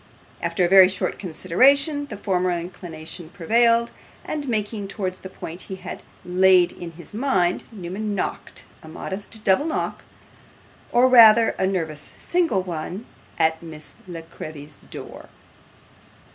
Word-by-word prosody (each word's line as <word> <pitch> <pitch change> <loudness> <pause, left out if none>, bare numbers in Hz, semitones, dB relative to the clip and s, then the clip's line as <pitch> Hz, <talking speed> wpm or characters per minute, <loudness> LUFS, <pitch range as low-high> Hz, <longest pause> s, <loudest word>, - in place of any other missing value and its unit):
After 180 - +1
a - - +3
very 190 0 +8
short 190 0 -3
consideration, 275 - +2
the 210 - -7
former 185 -3 0
inclination 170 -1 -6
prevailed, 230 +6 +2 0.3
and 295 -2 -4
making 210 -3 -2
towards 190 -2 -4
the 190 - -9
point 175 -1 -8
he 190 - -4
had 190 - -8 0.2
had 180 0 +4
in 170 -1 -7
his 165 +1 -12
mind, 195 -7 +1
Newman 205 +1 -4
knocked 185 - -5 0.2
a - - -13
modest 205 +6 -5
double 195 +9 +3
knock, 320 - -3 0.9
or 245 +2 +5
rather 230 -3 +8
a 190 - -1
nervous 160 -6 -4
single 340 - +1
one, 180 +5 -5 0.3
at 160 0 +2
Miss 155 -2 -10
La 170 -2 -7
Creevy's 150 -2 -10
door. - - -9
190 Hz, 135 wpm, -23 LUFS, 170-220 Hz, 0.9 s, very